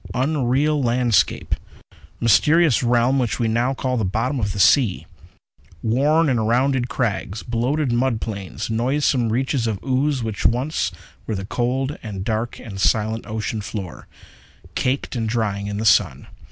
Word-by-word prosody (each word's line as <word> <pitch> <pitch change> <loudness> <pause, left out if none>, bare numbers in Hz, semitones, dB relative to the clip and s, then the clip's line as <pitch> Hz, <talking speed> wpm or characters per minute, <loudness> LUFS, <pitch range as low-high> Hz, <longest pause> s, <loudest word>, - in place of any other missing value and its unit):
Unreal 140 +2 +1
landscape! 120 -3 +1 0.7
Mysterious 150 - +4
realm 120 +2 +2
which 125 -1 -1
now 115 +2 +1
we 135 - -2
call 130 -1 -1
the 110 - 0
bottom 115 +8 -1
of 100 -3 -1
the 100 - -5
sea! 100 - +4 0.8
Worn 145 +8 +2
and 115 -5 +1
rounded 125 +1 +1
crags; 110 -4 -2
bloated 125 +4 -1
mud 120 -1 +1
plains; 100 -5 -5
noisome 125 0 +1
reaches 130 0 0
of 110 -3 -1
ooze 135 0 0
which 110 -3 -4
once 130 +7 0 0.4
were 110 - -2
the 95 0 -4
cold 130 +6 -2
and 100 -4 -6
dark 115 +1 -2
and 100 -5 -7
silent 110 +2 +1
ocean 110 0 -3
floor, 100 -4 -7 0.7
caked 130 +1 -1
and 115 -2 -1
drying 105 -3 -1
in 100 0 -4
the 110 - -2
sun. 90 -10 +3
120 Hz, 150 wpm, -21 LUFS, 110-130 Hz, 0.8 s, Mysterious